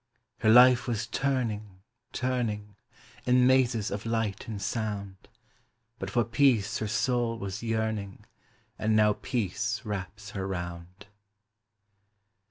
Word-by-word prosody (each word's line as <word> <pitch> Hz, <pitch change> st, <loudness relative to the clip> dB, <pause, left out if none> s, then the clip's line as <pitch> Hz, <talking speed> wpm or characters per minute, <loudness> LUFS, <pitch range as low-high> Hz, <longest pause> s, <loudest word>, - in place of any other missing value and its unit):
Her 110 Hz, -, +2 dB
life 125 Hz, +2 st, +7 dB
was 115 Hz, -3 st, -1 dB
turning, 110 Hz, -8 st, -2 dB, 0.3 s
turning, 110 Hz, -5 st, -2 dB, 0.5 s
In 125 Hz, 0 st, +5 dB
mazes 125 Hz, -5 st, +3 dB
of 100 Hz, +1 st, -4 dB
light 115 Hz, -3 st, -2 dB
and 110 Hz, -3 st, -5 dB
sound, 100 Hz, -2 st, -4 dB, 0.7 s
But 95 Hz, -, -4 dB
for 120 Hz, +4 st, +2 dB
peace 115 Hz, -3 st, +2 dB
her 110 Hz, -, -2 dB
soul 120 Hz, +1 st, 0 dB
was 95 Hz, -3 st, -5 dB
yearning 110 Hz, -3 st, -2 dB, 0.5 s
And 110 Hz, 0 st, +1 dB
now 105 Hz, -1 st, +5 dB
peace 105 Hz, -3 st, -2 dB
wraps 105 Hz, 0 st, -6 dB
her 95 Hz, -2 st, -4 dB
round. 85 Hz, +1 st, -6 dB
110 Hz, 115 wpm, -28 LUFS, 100-120 Hz, 0.7 s, life